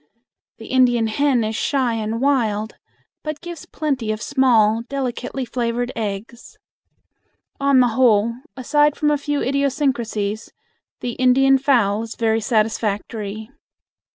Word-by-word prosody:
The 225 - -11
Indian 245 -3 +3
hen 250 +2 +1
is 220 +1 -2
shy 260 -1 0
and 225 0 -3
wild, 225 -6 0 0.5
but 305 -1 -5
gives 345 -2 -9
plenty 270 -8 -2
of 215 - -3
small, 230 -4 +3
delicately 260 -1 -3
flavored 240 0 -2
eggs. 220 +2 -6 1.0
On 275 -2 +4
the 245 - +3
whole, 230 -2 +3 0.2
aside 295 +3 +2
from 295 -1 +1
a 295 - +2
few 290 0 -2
idiosyncrasies, 255 -7 -1 0.5
the 245 - -2
Indian 270 +1 +4
fowl 230 -7 +2
is 225 -1 -7
very 225 -1 +1
satisfactory. 215 0 -2
240 Hz, 125 wpm, -21 LUFS, 220-270 Hz, 1.0 s, On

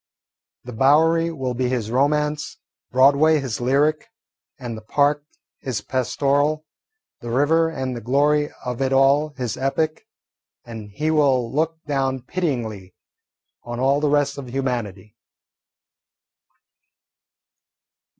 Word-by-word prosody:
The 125 - -9
Bowery 160 +7 +3
will 135 -6 -3
be 125 +1 -1
his 115 -4 -2
romance, 150 +3 0 0.3
Broadway 140 +5 +4
his 130 -4 -4
lyric, 145 - +1 0.5
and 120 -5 -6
the 110 - -9
Park 145 +6 +1 0.4
his 120 -6 -4
pastoral, 140 +5 0 0.5
the 120 - -7
river 155 +6 +2
and 130 -5 -4
the 120 - -6
glory 145 +5 +2 0.2
of 125 0 -4
it 135 0 +1
all 140 +3 +4
his 125 -4 -3
epic, 140 +4 -2 0.6
and 110 -3 -9
he 150 +10 -2
will 135 -6 +2
look 160 +2 -1
down 135 -3 -1
pityingly 120 - -4 0.7
on 120 0 -6
all 135 +2 +2
the 150 0 +1
rest 145 -1 +1
of 130 -3 -8
humanity. 120 -6 -4
135 Hz, 120 wpm, -22 LUFS, 125-150 Hz, 0.7 s, Broadway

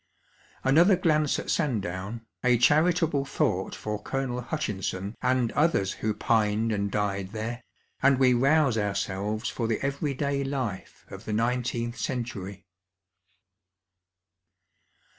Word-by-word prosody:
Another 170 +9 +5
glance 155 -4 +2
at - - -3
Sandown, 110 - -2 0.2
a 125 -1 +4
charitable 155 +3 +3
thought 135 - -1
for 105 -1 -4
Colonel 125 0 -2
Hutchinson 105 - -3
and 125 -2 +1
others 145 - +2
who 110 -1 -2
pined 110 0 +1
and 100 -1 -1
died 100 -1 -2
there, 115 +2 -4 0.4
and 135 -1 +5
we 130 -1 +5
rouse 135 -1 +3
ourselves 105 +2 -2
for 115 - -2
the 110 - 0
everyday 140 0 -1
life 130 -8 -4
of 95 +3 -10
the 110 - -3
nineteenth 120 +1 -1
century. 100 -6 -4
120 Hz, 115 wpm, -27 LUFS, 105-135 Hz, 0.4 s, Another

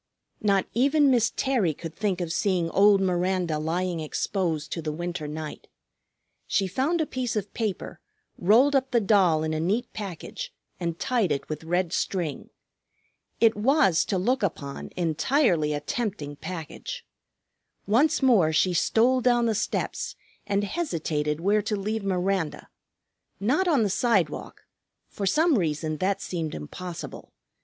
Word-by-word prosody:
Not 200 -2 +2
even 280 +4 +4
Miss 235 -3 +3
Terry 230 - +1
could 165 0 -7
think 195 -3 -1
of 170 -2 -2
seeing 180 -5 0
old 200 0 +5
Miranda 180 -3 0
lying 170 +2 -1
exposed 160 0 -2
to 165 - -3
the 155 -1 -3
winter 175 0 -4
night. 155 0 -7 0.8
She 195 - +1
found 270 - 0
a - - +1
piece 255 -5 -3
of 210 -1 -3
paper, 215 -5 -3 0.4
rolled 240 +10 +4
up 265 -1 +2
the 240 - +3
doll 190 -7 +3
in 155 0 -1
a 155 - -1
neat 205 +9 -1
package, 210 - -6 0.3
and 170 -2 -2
tied 230 -8 0
it 140 - -2
with 155 0 -5
red 175 +1 0
string. 170 -7 -2 0.9
It 225 -1 +5
was, 240 - +3
to 195 - -1
look 250 +8 +1
upon, 140 -7 -3
entirely 170 - +2
a 145 - -1
tempting 155 -4 -3
package. 180 - -7 0.8
Once 270 +8 +3
more 210 -12 +5
she 180 +4 +2
stole 240 +9 +3
down 240 -1 +3
the 225 - +2
steps 215 - -2 0.3
and 200 0 +1
hesitated 160 - -2
where 205 +4 +2
to 215 +1 -2
leave 210 +2 -2
Miranda: 185 -3 -1 0.7
not 270 - +1
on 290 -9 +3
the - - +2
sidewalk, 195 -6 0 0.5
for 200 - -3
some 310 - +3
reason 155 -2 -1
that 190 +4 -1
seemed 165 -4 -3
impossible. 170 - -8
190 Hz, 150 wpm, -26 LUFS, 165-230 Hz, 0.9 s, old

